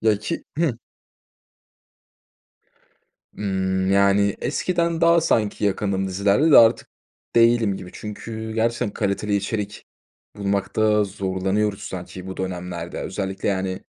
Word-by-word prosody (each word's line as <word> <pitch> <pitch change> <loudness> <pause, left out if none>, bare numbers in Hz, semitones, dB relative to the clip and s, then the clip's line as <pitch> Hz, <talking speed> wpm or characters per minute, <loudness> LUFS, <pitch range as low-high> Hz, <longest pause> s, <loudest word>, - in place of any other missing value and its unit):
Ya, 110 -2 +3
ki 105 - -4
Hıı. 150 -9 +1 2.6
Imm, 95 -1 -1
yani, 100 0 +3
eskiden 170 +2 0
daha, 170 0 +5
sanki, 105 -8 +1
yakındım 95 -1 0
dizilerle 100 - +2
de - - +9
artık 115 -1 +5 0.5
değilim 115 -4 +4
gibi. 90 - -9
Çünkü 110 +1 -6
gerçekten 115 -1 0
kaliteli 100 +1 -1
içerik 105 +1 -3 0.5
bulmakta 100 +2 +1
zorlanıyoruz 100 +1 -1
sanki 95 -1 -7
bu 95 - -7
dönemlerde, 90 -2 -5
özellikle, 95 +1 -3
yani, 95 -1 -2
100 Hz, 110 wpm, -23 LUFS, 95-110 Hz, 2.6 s, de